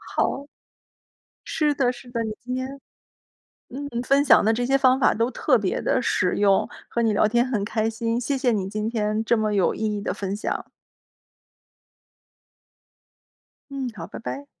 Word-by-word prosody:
好。 280 - 0 1.0
是 305 -2 +1
的， 250 -3 +2
是 245 0 -13
的， 230 -1 -2
你 215 -1 -3
今 250 - -6
天 260 +2 -4 0.9
嗯， 280 +3 -6 0.2
分 275 +3 +3
享 280 - +6
的 215 - +3
这 245 +2 -1
些 270 +2 +3
方 260 -1 +4
法 - - +4
都 230 +3 0
特 - - +2
别 - - -1
地 - - +1
实 - - +1
用， 200 -1 +3 0.2
和 235 - -1
你 225 -2 +2
聊 210 +1 +3
天 240 +3 +2
很 235 -6 -1
开 220 +2 0
心， 230 +1 -1
谢 270 +3 -1
谢 255 -2 +2
你 200 -4 -1
今 215 +1 -2
天 215 -1 0
这 235 +1 +2
么 215 -1 0
有 195 -3 +2
意 - - -9 0.2
义 - - -3
的 200 - -3
分 195 -1 -3
享。 210 - -4 3.0
嗯， 270 -2 -3
好， 165 -4 -7
拜 - - -8
拜。 275 +5 -6
235 Hz, 190 characters per minute, -24 LUFS, 215-260 Hz, 3.0 s, 享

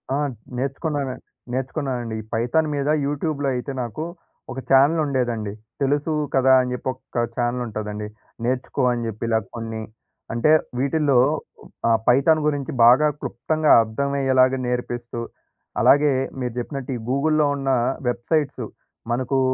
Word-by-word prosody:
ఆ! - - +1 0.4
నేర్చుకున్నాన 140 +2 -2 0.4
నేర్చుకున్నానండి. 130 -3 -2
ఈ - - -12
పైథాన్ 120 +8 +1
మీద 140 0 -1 0.2
యూట్యూబ్‌లో 145 0 -1
అయితే 125 +3 -4
నాకు 120 +6 -4 0.5
ఒక 130 - -5
ఛానెల్ 140 +5 +5
ఉండేదండి. 120 -7 -1 0.3
తెలుసు 145 +3 +1 0.2
కదా! 130 0 +5
అని 125 0 -3
చెప్పి 125 - -3
ఒక 120 -2 -3
ఛానెల్ 120 0 0
ఉంటదండి. 105 -1 -5 0.4
నేర్చుకో 130 +1 -1
అని 120 -1 -3
చెప్పి 110 0 -6
ఇలా 110 -1 +3 0.2
కొన్ని 115 -1 -5 0.5
అంటే 120 +6 +3 0.3
వీటిల్లో 140 0 +2 0.7
ఆహ్, 115 -1 +5
పైథాన్ 140 +6 +5
గురించి 145 -3 -1
బాగా 130 +6 +7
క్లుప్తంగా 150 +4 0
అర్థమయ్యేలాగ 130 +2 +2
నేర్పిస్తూ, 120 -1 -3 0.6
అలాగే 145 +1 +5 0.3
మీరు 125 -2 -3
చెప్పినట్టు 135 +1 -5
ఈ - - -7
గూగుల్‌లో 150 +3 +2
ఉన్న 135 -1 -2 0.4
వెబ్‌సైట్స్ 140 +5 0 0.5
మనకు 130 +2 0
130 Hz, 125 wpm, -23 LUFS, 120-145 Hz, 0.7 s, బాగా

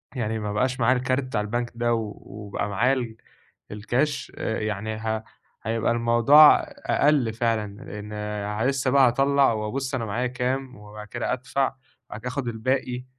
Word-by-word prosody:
يعني 110 -3 -2
ما 105 -1 -3
بقاش 125 +4 0
معايا 125 +2 +3
الكارت 130 +2 0
بتاع 115 -5 -2
البنك 120 +3 -2
ده 120 0 +1
و 110 -2 -2
وبقى 105 0 -5
معايا 120 +7 +2
ال 115 -4 -3 0.5
الكاش 120 +8 -1
آآ 110 - -2
يعني، 110 0 -3
ه 110 0 -2 0.4
هيبقى 115 +1 0
الموضوع 120 +6 +7 0.3
أقل 140 -6 +2
فعلًا، 110 -3 -1
لأن 105 +1 -4
لسه 135 -2 0
بقى 140 -2 +6
هاطلّع 135 +1 +3
وأبص 130 +6 -3
أنا 115 -3 -2
معايا 120 +5 -1
كام، 125 +1 -2
وبعد 105 0 -11
كده 120 +2 -2
أدفع، 135 +2 -1 0.3
وبعد 105 - -7
كده 125 - -6
آخد 135 -1 -3
الباقي، 125 +2 -2
115 Hz, 160 wpm, -25 LUFS, 110-130 Hz, 0.5 s, الموضوع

